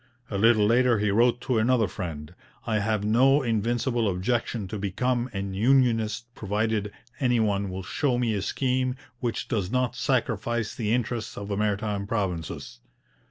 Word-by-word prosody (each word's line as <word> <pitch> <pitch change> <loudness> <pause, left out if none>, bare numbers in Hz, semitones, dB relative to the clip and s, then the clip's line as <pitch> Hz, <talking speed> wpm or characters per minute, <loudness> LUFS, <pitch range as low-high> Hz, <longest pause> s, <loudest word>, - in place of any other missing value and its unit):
A 100 - -1
little 110 -1 +5
later 120 +2 +4
he 105 -1 +1
wrote 120 +3 +3
to 125 -3 0
another 115 -1 +3
friend: 85 -4 -6 0.3
'I 110 -2 +1
have 105 0 0
no 135 +6 +4
invincible 115 0 0
objection 110 +2 -1
to 105 - -4
become 120 +6 -1
an 95 -1 -4
unionist 115 -1 +2
provided 105 0 -1 0.3
any 125 -4 +2
one 100 -2 +1
will 95 +1 -5
show 125 +7 0
me 120 -2 +1
a 100 - -1
scheme 130 +3 0 0.2
which 120 -2 -2
does 100 -7 -1
not 125 -1 0
sacrifice 120 -3 -1
the 110 -3 -2
interests 120 -1 -2
of 100 0 -6
the 100 - -1
Maritime 105 -1 -1
Provinces.' 90 - -3
110 Hz, 160 wpm, -26 LUFS, 100-120 Hz, 0.3 s, little